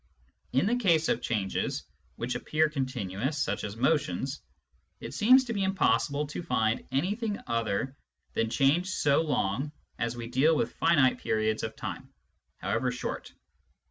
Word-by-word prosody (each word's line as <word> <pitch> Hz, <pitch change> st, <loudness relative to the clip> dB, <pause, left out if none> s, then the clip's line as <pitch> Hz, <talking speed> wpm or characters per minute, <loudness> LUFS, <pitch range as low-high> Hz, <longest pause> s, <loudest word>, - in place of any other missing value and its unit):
In 135 Hz, +8 st, +2 dB
the 235 Hz, +4 st, +2 dB
case 170 Hz, -9 st, +3 dB
of -, -, +1 dB
changes 100 Hz, -4 st, -1 dB, 0.3 s
which -, -, -3 dB
appear 155 Hz, 0 st, +1 dB
continuous, 130 Hz, -2 st, -2 dB
such 135 Hz, -, -1 dB
as 105 Hz, 0 st, -4 dB
motions, 135 Hz, -, 0 dB, 0.6 s
it -, -, -7 dB
seems 255 Hz, +5 st, +6 dB
to 240 Hz, -2 st, -4 dB
be 200 Hz, -, -1 dB
impos 190 Hz, -4 st, +2 dB
sible 145 Hz, +1 st, -2 dB
to 150 Hz, -, -4 dB
find 115 Hz, -9 st, 0 dB
anything 205 Hz, -, -1 dB
other 115 Hz, +3 st, -1 dB, 0.4 s
than 115 Hz, 0 st, 0 dB
change 145 Hz, +9 st, +2 dB
so 145 Hz, -5 st, +3 dB
long 135 Hz, -2 st, -1 dB, 0.3 s
as 120 Hz, 0 st, -1 dB
we 120 Hz, -, -5 dB
deal 135 Hz, +7 st, +3 dB
with -, -, 0 dB
finite 135 Hz, -6 st, +3 dB
periods 110 Hz, 0 st, 0 dB
of 110 Hz, 0 st, -4 dB
time, -, -, -6 dB, 0.5 s
however 125 Hz, -1 st, 0 dB
short. 125 Hz, -, -5 dB
135 Hz, 150 wpm, -29 LUFS, 115-165 Hz, 0.6 s, seems